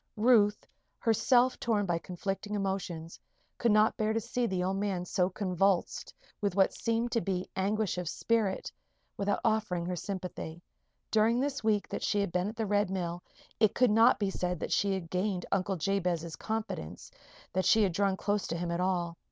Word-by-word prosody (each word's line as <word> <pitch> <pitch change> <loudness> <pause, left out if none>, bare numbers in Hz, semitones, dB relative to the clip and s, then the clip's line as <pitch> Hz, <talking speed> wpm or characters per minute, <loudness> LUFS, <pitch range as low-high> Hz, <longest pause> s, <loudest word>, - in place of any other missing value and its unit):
Ruth, 210 -2 +4 0.3
herself 245 +3 +3
torn 215 -4 +1
by 170 -2 0
conflicting 195 +4 -4
emotions, 190 -5 -3 0.4
could 235 - +3
not 215 +1 +4
bear 215 0 +1
to 225 - +1
see 235 +2 -1
the 185 -3 -1
old 190 +1 0
man 195 -3 -1
so 180 0 +1
convulsed 190 -2 0 0.3
with 200 -3 0
what 195 -1 +4
seemed 230 +1 -1
to 230 - +1
be 185 -2 -2
anguish 200 0 0
of 175 -3 -3
spirit, 220 -3 0 0.4
without 200 0 0
offering 205 -6 +1
her 180 +1 -2
sympathy. 175 -2 -6 0.5
During 225 +2 +3
this 280 0 -2
week 215 -2 +1
that - - -4
she 205 - +1
had 200 -3 0
been 180 +3 0
at 220 - -8
the 225 -1 -1
Red 205 -1 +1
Mill 175 -2 -3 0.4
it 215 -1 +3
could 250 -3 +4
not 225 +3 +6
be 200 -2 -1
said 180 -2 -2
that - - -4
she 200 0 +2
had 170 -3 -6
gained 185 -1 -1
Uncle 195 0 0
Jabez's 175 -3 -1
confidence 195 - -5 0.4
that 185 0 0
she 220 -1 +5
had 195 - +2
drawn 195 +1 +1
close 205 0 -1
to 170 - -3
him 170 0 -3
at 170 - -1
all. 175 -2 -1
195 Hz, 185 wpm, -30 LUFS, 180-215 Hz, 0.5 s, not